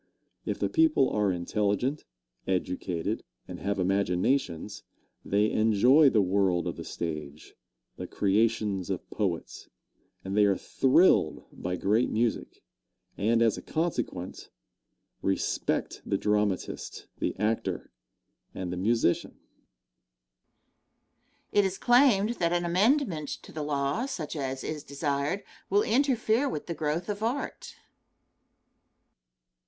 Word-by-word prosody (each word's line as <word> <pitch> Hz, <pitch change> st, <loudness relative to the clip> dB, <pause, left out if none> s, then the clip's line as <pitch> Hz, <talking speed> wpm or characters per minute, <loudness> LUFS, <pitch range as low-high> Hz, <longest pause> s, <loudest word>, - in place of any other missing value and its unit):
If -, -, -1 dB
the -, -, 0 dB
people 320 Hz, -, +3 dB
are 105 Hz, -2 st, +1 dB
intelligent, 105 Hz, +10 st, -1 dB, 0.4 s
educated, 90 Hz, -2 st, -2 dB, 0.2 s
and -, -, -7 dB
have 100 Hz, 0 st, -2 dB
imaginations, 95 Hz, -, 0 dB, 0.4 s
they 105 Hz, +2 st, +1 dB
enjoy 120 Hz, +8 st, +5 dB
the 110 Hz, -5 st, +3 dB
world 95 Hz, -2 st, +1 dB
of -, -, -3 dB
the -, -, -7 dB
stage, 75 Hz, -3 st, -6 dB, 0.4 s
the -, -, -6 dB
creations 105 Hz, -2 st, +1 dB
of 95 Hz, -3 st, -3 dB
poets, 95 Hz, -6 st, -3 dB, 0.6 s
and 95 Hz, +1 st, -3 dB
they 105 Hz, 0 st, +5 dB
are 100 Hz, -1 st, +2 dB
thrilled 135 Hz, -, +3 dB
by 90 Hz, 0 st, -3 dB
great 105 Hz, +6 st, +1 dB
music, 115 Hz, 0 st, -2 dB, 0.5 s
and, 115 Hz, +3 st, +2 dB
as 115 Hz, -2 st, +2 dB
a -, -, -10 dB
consequence, 120 Hz, -, -3 dB, 0.7 s
respect 95 Hz, -1 st, -1 dB
the -, -, 0 dB
dramatist, 105 Hz, -3 st, -1 dB
the -, -, -2 dB
actor 110 Hz, +3 st, -2 dB, 0.6 s
and 90 Hz, -1 st, -4 dB
the -, -, -4 dB
musician. 105 Hz, -1 st, +1 dB
Question. -, -, -32 dB, 2.1 s
It 205 Hz, -, +4 dB
is 190 Hz, -1 st, -1 dB
claimed 240 Hz, -5 st, +4 dB
that 170 Hz, -1 st, +1 dB
an 175 Hz, 0 st, 0 dB
amendment 185 Hz, -, +2 dB
to -, -, -12 dB
the 155 Hz, -, -5 dB
law, 145 Hz, -, -1 dB
such 165 Hz, -, -5 dB
as 135 Hz, -2 st, -3 dB
is 150 Hz, -2 st, -4 dB
desired, 140 Hz, +5 st, -2 dB, 0.3 s
will 205 Hz, +2 st, +3 dB
interfere 255 Hz, 0 st, +2 dB
with 150 Hz, -, -4 dB
the 170 Hz, -, -3 dB
growth 160 Hz, +2 st, -2 dB
of 205 Hz, 0 st, -4 dB
art? 245 Hz, +5 st, -3 dB
115 Hz, 120 wpm, -28 LUFS, -, 2.1 s, enjoy